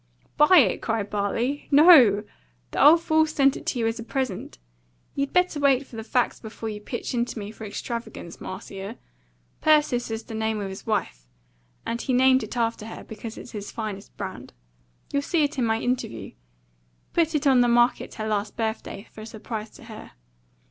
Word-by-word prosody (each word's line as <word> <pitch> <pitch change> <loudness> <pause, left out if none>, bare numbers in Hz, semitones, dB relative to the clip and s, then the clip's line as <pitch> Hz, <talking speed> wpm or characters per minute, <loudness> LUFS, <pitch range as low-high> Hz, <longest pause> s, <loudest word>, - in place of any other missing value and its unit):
"Buy 300 +5 +6
it?" 230 - +4
cried 220 -3 -2
Bartley. 230 +7 -1
"No! 275 - +7 0.5
The - - +1
old 330 +3 +7
fool's 315 -1 +3
sent 275 -3 +3
it - - -9
to - - -1
you 230 - 0
as 225 +1 -1
a - - -5
present. 255 -5 -4 0.6
You'd 280 0 -2
better 360 -4 +2
wait 275 -1 +3
for 250 - -14
the 225 - -5
facts 245 +2 0
before 220 0 -7
you 210 -1 -6
pitch 240 +4 -5
into 240 0 -2
me 205 -1 -6
for 220 0 -9
extravagance, 210 -4 -6
Marcia. 195 +3 -7 0.6
Persis 295 -6 +3
is 225 0 -4
the - - -10
name 220 0 -1
of 200 -1 -4
his 190 +3 -9
wife; - - -2 0.6
and 235 0 -3
he 260 - -1
named 260 +1 +5
it - - -6
after 230 -2 -1
her - - -8
because 220 +1 -8
it's - - -10
his 205 -2 -6
finest 215 -3 -6
brand. 190 -2 -7 0.6
You'll 280 - +2
see 315 +2 +1
it 290 -1 -1
in 245 - +2
my 225 0 +1
interview. 170 - -3 0.8
Put 330 -2 +1
it 300 0 0
on 265 -3 +5
the 245 - +4
market 240 +1 +2
her 215 -1 -4
last 210 -1 -2
birthday 220 -2 -4
for 215 - -11
a - - -8
surprise 220 0 -6
to - - -14
her." 220 -2 -11
230 Hz, 190 wpm, -25 LUFS, 215-270 Hz, 0.8 s, No